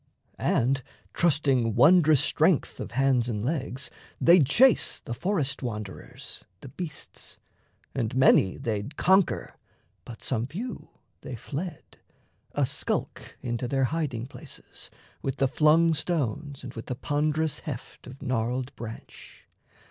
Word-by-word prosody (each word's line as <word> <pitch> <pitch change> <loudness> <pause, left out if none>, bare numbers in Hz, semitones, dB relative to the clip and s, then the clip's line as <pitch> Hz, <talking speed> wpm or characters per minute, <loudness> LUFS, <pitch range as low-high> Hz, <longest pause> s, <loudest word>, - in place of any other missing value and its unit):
And 135 +3 +2 0.3
trusting 135 -9 +2
wondrous 155 +1 +6
strength - - +2
of - - -6
hands 130 -2 +2
and 105 -3 -2
legs, 135 -3 -2 0.3
They'd 170 -5 +6
chase 255 - +4
the 120 - -6
forest 145 - -1
wanderers, 105 -6 -7 0.2
the 135 - -9
beasts; 160 +2 -7 0.6
And 120 -1 -2
many 130 -7 +5
they'd 110 +5 -3
conquer, 190 0 +2 0.5
but 115 - -10
some 120 -2 -1
few 220 - -6 0.3
they 130 - -6
fled, 155 +7 -7 0.5
A - - +2
skulk - - -3
into 120 0 -2
their 135 +1 +1
hiding 140 -8 -2
places... 130 - -11 0.3
With 135 -1 -2
the 135 -1 +2
flung 160 +4 +4
stones 145 -3 -2
and 125 -1 -7
with 115 - -8
the 125 - -3
ponderous 150 +2 0
heft 130 -4 -8
Of 130 +2 -11
gnarled 125 +1 -1
branch. 115 -1 -10
135 Hz, 125 wpm, -27 LUFS, 120-155 Hz, 0.6 s, wondrous